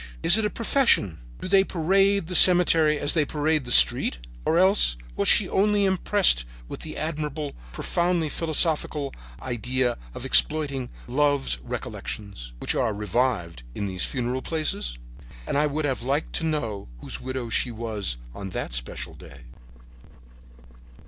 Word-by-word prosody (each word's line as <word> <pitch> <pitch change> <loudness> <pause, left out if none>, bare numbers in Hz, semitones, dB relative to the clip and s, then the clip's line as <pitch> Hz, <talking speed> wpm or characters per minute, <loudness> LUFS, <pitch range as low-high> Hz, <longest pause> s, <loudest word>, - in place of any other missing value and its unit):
Is 175 - +5
it 220 -1 +1
a - - +1
profession? 230 - +2 0.2
Do - - -4
they 195 +1 +5
parade 195 +2 +2
the 180 - -6
cemetery 165 -4 +6
as 145 - 0
they 155 - +2
parade 150 0 -1
the 120 - -6
street? - - +5 0.3
Or 165 - +2
else 185 - +3 0.2
was - - -1
she - - +5
only 205 +1 +2
impressed 190 - +2 0.2
with - - -7
the 155 - -8
admirable, 150 -2 -4 0.2
profoundly 170 - -1
philosophical 155 -2 0 0.3
idea 125 - -2 0.2
of - - -7
exploiting 140 -5 +2 0.2
love 140 - 0
recollections, 100 - -6
which - - -2
are 110 - 0
revived 105 - -1
in 100 - -3
these 95 -2 -3
funereal 125 0 -2
places? 155 - -3 0.5
"And - - -3
I 150 +1 +3
would 150 +1 -2
have 135 -4 -1
liked 140 +5 -2
to 165 - -3
know 115 - -3
whose - - -6
widow 130 -2 -4
she 125 - +1
was 110 - -3 0.2
on 100 +6 -7
that 90 - -5
special - - -4
day." 70 -3 -13
145 Hz, 150 wpm, -25 LUFS, 115-165 Hz, 0.5 s, cemetery